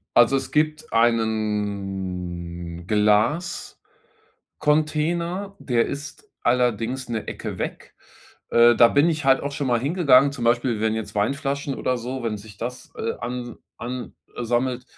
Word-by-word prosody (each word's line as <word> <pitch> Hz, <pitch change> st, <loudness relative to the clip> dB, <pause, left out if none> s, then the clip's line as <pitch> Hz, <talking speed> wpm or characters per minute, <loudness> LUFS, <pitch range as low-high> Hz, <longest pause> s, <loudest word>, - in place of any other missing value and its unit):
Also, 120 Hz, +3 st, +6 dB
es 135 Hz, -1 st, -5 dB
gibt 155 Hz, +1 st, 0 dB
einen 95 Hz, -6 st, -1 dB, 1.5 s
Glascontainer. 170 Hz, +6 st, -1 dB
Der 120 Hz, -3 st, +1 dB
ist 145 Hz, -, -7 dB
allerdings 125 Hz, +1 st, +1 dB
'ne 110 Hz, -2 st, -3 dB
Ecke -, -, -5 dB
weg. -, -, -5 dB, 0.6 s
Äh, 120 Hz, 0 st, +6 dB
da 120 Hz, -, +8 dB
bin 145 Hz, +6 st, +4 dB
ich 155 Hz, -3 st, -1 dB
halt 135 Hz, 0 st, +5 dB
auch 140 Hz, -, -4 dB
schon 140 Hz, 0 st, -2 dB
mal 120 Hz, -2 st, +2 dB
hingegangen. 140 Hz, -2 st, +4 dB
Zum 130 Hz, -4 st, -5 dB
Beispiel, 120 Hz, -1 st, +2 dB
wenn 110 Hz, 0 st, +1 dB
jetzt 110 Hz, -1 st, -5 dB
Weinflaschen 140 Hz, +6 st, -1 dB
oder 130 Hz, -1 st, -1 dB
so 125 Hz, +2 st, -5 dB
wenn 115 Hz, -2 st, -2 dB
sich 105 Hz, 0 st, -12 dB
das, 125 Hz, +3 st, -6 dB
äh, -, -, -2 dB
an 120 Hz, -1 st, -5 dB, 0.2 s
an, 125 Hz, +1 st, -5 dB, 0.2 s
äh, 120 Hz, -, -3 dB
sammelt, 125 Hz, +2 st, 0 dB
120 Hz, 140 wpm, -23 LUFS, 110-140 Hz, 1.5 s, da